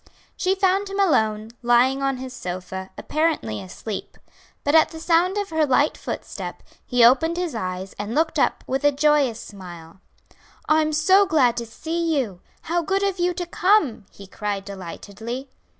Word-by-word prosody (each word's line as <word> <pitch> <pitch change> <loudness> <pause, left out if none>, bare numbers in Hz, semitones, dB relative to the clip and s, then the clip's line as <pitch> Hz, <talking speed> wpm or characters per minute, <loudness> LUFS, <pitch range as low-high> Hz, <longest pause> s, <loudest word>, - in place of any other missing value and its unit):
She 375 +1 +1
found 390 +1 +1
him 395 +1 -4
alone, 220 - +2
lying 245 +3 +3
on 275 -1 0
his 255 0 -7
sofa, 190 -3 -6
apparently 305 - -1
asleep; 195 - -7 0.5
but 285 - +1
at 320 -1 +6
the 320 - -9
sound 345 +4 +2
of 405 -3 -2
her 315 -1 +2
light 290 +1 +3
footstep - - -6 0.2
he 245 -2 +4
opened 320 +8 +4
his 355 -3 -2
eyes 185 -3 -4
and 205 +3 -4
looked 320 0 +1
up - - +1
with 270 +2 -2
a 290 - +5
joyous 285 -5 +2
smile. 175 -3 -11 0.7
"I'm 310 0 +3
so 375 +6 +4
glad 255 -8 +3
to 235 -1 -3
see 325 +6 -2
you! 205 -10 -2 0.2
how 345 +2 0
good 390 +4 0
of 390 -2 -1
you 355 0 +1
to 355 - -3
come!" 345 - +2
he 200 - -13
cried 200 0 -4
delightedly. 205 +7 -7
275 Hz, 165 wpm, -23 LUFS, 215-330 Hz, 0.7 s, at